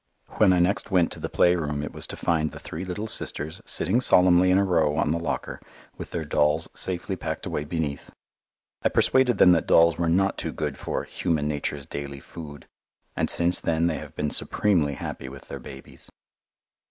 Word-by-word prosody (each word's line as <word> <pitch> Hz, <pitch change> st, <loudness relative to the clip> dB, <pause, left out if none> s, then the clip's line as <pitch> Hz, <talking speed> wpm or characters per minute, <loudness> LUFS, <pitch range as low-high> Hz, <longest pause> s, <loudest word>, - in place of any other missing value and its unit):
When 105 Hz, -3 st, +5 dB
I 90 Hz, -, +3 dB
next 90 Hz, +6 st, +1 dB
went 90 Hz, -4 st, +2 dB
to -, -, -7 dB
the -, -, -4 dB
playroom 75 Hz, -5 st, +1 dB
it 75 Hz, -, -6 dB
was -, -, -5 dB
to -, -, -8 dB
find 80 Hz, -2 st, 0 dB
the -, -, -10 dB
three 80 Hz, -, -7 dB
little 95 Hz, +3 st, -4 dB
sisters 80 Hz, -7 st, -2 dB
sitting 110 Hz, +9 st, +1 dB
solemnly 90 Hz, -4 st, +5 dB
in 90 Hz, -, +5 dB
a 100 Hz, -, +4 dB
row 80 Hz, -5 st, +2 dB
on 75 Hz, -1 st, +1 dB
the 85 Hz, -, 0 dB
locker 85 Hz, -, -4 dB, 0.3 s
with -, -, -8 dB
their 80 Hz, -2 st, -4 dB
dolls 75 Hz, +2 st, +2 dB
safely 90 Hz, -2 st, -2 dB
packed -, -, -5 dB
away 75 Hz, -, -3 dB
beneath. 75 Hz, -3 st, -3 dB, 0.7 s
I -, -, +2 dB
persuaded 130 Hz, -4 st, +3 dB
them 90 Hz, -, +7 dB
that 85 Hz, -2 st, +2 dB
dolls 85 Hz, -1 st, +5 dB
were 85 Hz, -1 st, +1 dB
not 95 Hz, +3 st, +1 dB
too -, -, -4 dB
good 75 Hz, -3 st, -3 dB
for -, -, -3 dB
"human 80 Hz, -5 st, -1 dB
nature's 75 Hz, -1 st, -3 dB
daily 70 Hz, -1 st, -6 dB
food," 75 Hz, -1 st, -10 dB, 0.5 s
and -, -, 0 dB
since 85 Hz, +1 st, +1 dB
then 80 Hz, 0 st, 0 dB
they 85 Hz, -2 st, 0 dB
have -, -, -11 dB
been 75 Hz, -1 st, -2 dB
supremely 85 Hz, -9 st, +1 dB
happy 65 Hz, -, -6 dB
with 65 Hz, 0 st, -12 dB
their -, -, -6 dB
babies. 65 Hz, 0 st, -12 dB
85 Hz, 195 wpm, -25 LUFS, 75-90 Hz, 0.7 s, them